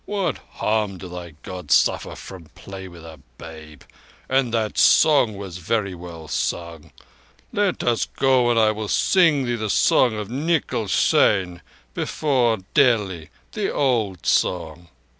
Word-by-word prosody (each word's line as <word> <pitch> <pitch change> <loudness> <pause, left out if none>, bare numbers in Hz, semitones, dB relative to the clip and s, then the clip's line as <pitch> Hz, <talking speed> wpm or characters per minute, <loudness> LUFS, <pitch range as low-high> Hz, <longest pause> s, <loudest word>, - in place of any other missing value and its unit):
What 200 -2 -2
harm 105 -3 -1
do 90 - -9
thy 90 -3 -9
Gods 90 -1 +1
suffer - - -1
from 90 -4 -11
play 95 -1 -9
with 85 -2 -13
a 80 -2 -12 0.2
babe? 80 -3 -12 0.4
And 130 -2 +1
that 110 -2 -1
song 130 -9 +4
was 95 -3 -7
very 100 +2 -1
well 85 -2 -10
sung. 85 -2 -4 0.6
Let 205 -3 0
us 120 -2 0
go 130 -2 +2
on 120 -1 +2
and - - +5
I 110 -1 +4
will 110 0 -5
sing 160 - +3
thee 120 0 -1
the 110 -2 -4
song 115 +2 +3
of 105 -1 -5
Nikal 140 -3 -1
Seyn 90 -2 +2 0.3
before 125 -7 0 0.2
Delhi—the 110 - 0
old 110 - -1
song." 85 -1 -1
105 Hz, 140 wpm, -22 LUFS, 90-125 Hz, 0.6 s, and